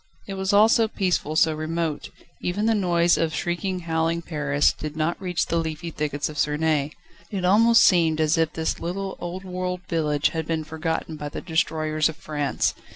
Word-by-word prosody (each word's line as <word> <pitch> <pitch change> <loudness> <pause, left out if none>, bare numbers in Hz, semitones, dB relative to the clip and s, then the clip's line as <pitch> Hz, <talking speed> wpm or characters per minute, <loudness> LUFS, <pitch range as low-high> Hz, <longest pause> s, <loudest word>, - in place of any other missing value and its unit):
It 200 - -5
was 190 0 -1
all 205 +2 +6
so 225 -1 +3
peaceful, 180 -7 -1
so 160 0 +4
remote: 155 0 -3 0.3
even 200 +4 -1
the 225 - +3
noise 175 -4 +2
of 160 -2 0
shrieking, 180 +3 -2
howling 165 0 -1
Paris 150 -3 +1
did 155 0 -7
not 160 +4 -1
reach 180 -3 -1
the 170 - -1
leafy 165 +1 -3
thickets 150 -2 -2
of 150 -1 -6
Suresnes. 150 0 +1 0.4
It 190 -3 -3
almost 225 +5 +6
seemed 165 -4 +3
as 155 +1 +3
if 165 -1 +1
this 160 -1 -2
little 190 +3 -4
old 175 +2 -5
world 180 0 -3
village 150 -3 +1
had 160 -1 -4
been 160 -1 -1
forgotten 160 0 -3
by 150 -1 -5
the - - -6
destroyers 155 -2 0
of 160 - -6
France. 145 -3 -1
165 Hz, 185 wpm, -24 LUFS, 155-180 Hz, 0.4 s, all